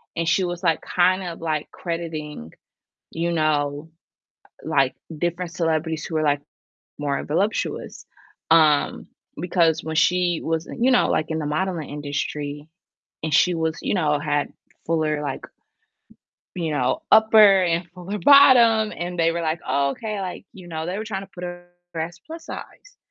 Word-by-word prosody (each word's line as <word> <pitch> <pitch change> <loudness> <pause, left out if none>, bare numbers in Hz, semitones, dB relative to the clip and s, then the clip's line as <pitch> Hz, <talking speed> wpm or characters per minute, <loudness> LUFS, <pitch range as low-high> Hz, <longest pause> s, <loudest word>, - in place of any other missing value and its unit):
and 165 -1 -2
she 190 - +2
was 175 0 -3
like 165 -4 +1
kind 185 +1 +2
of 170 -2 -7
like 155 -2 -2
crediting, 155 - -6 0.6
you 170 +1 -2
know, 150 -1 0 0.7
like 135 -4 +1 0.2
different 175 +1 -2
celebrities 160 -2 -1
who 165 - -7
were, 155 - +2
like, 145 -1 +1 0.6
more 140 -1 -2
voluptuous, 195 +8 -2 0.5
um, 155 -3 +3 0.3
because 170 -2 +2
when 160 0 -4
she 175 0 +2
was 165 0 -2
you 250 +3 +3
know, 250 - +4
like 155 - +1
in 160 - -1
the 150 - -3
modeling 165 +1 -2
industry 145 +1 -4 0.6
and 155 -2 -1
she 180 +3 +4
was, 160 -1 -1
you - - -1
know, 150 -5 +1
had 145 -1 -1 0.3
fuller 155 -2 0
like 145 - -5 1.1
you 165 -3 -2
know, 130 -3 0
upper 215 -3 +7
and 170 0 0
fuller 195 +3 -5
bottom 230 -3 +6
and 175 +1 -4
they 165 0 +3
were 170 - -3
like, 160 +1 -2
"Oh, 140 +1 +1
okay," 215 +4 -5
like, 185 -2 -5
you 185 -2 -13
know, 160 -1 -4
they 180 +3 -3
were 220 - -4
trying 195 -3 -4
to 195 - -15
put 180 0 -7
her 175 0 -8 0.3
as 170 +2 -4
plus 325 0 -9
size, - - -10
165 Hz, 160 wpm, -23 LUFS, 155-180 Hz, 1.1 s, upper